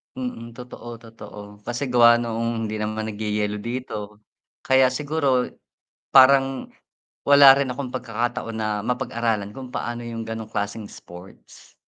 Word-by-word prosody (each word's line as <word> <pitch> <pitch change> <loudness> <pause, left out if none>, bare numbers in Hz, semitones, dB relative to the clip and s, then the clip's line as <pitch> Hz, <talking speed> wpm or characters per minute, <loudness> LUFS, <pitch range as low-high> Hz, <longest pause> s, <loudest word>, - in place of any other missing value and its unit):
Mm, 250 - -6
totoo, 120 -1 -10
totoo. 105 -2 -12
Kasi 120 +4 -3
gawa 120 -1 +6
noong 115 -1 -2
hindi 110 - -4
naman 110 0 -3
nagyeyelo 105 -1 -2
dito, 110 -4 -5 0.4
kaya 130 -1 +3
siguro 140 -2 0 0.6
parang 135 0 +5 0.5
wala 140 -1 +8
rin 135 -1 0
akong 125 0 -5
pagkakataon 120 -2 -3
na 105 -1 -2
mapag-aralan 115 -3 -2
kung 130 0 -9
paano 120 -1 -4
yung 115 -1 -6
ganong 110 -1 -6
klaseng 105 0 -4
sports. 90 +2 -14
115 Hz, 125 wpm, -23 LUFS, 110-130 Hz, 0.6 s, wala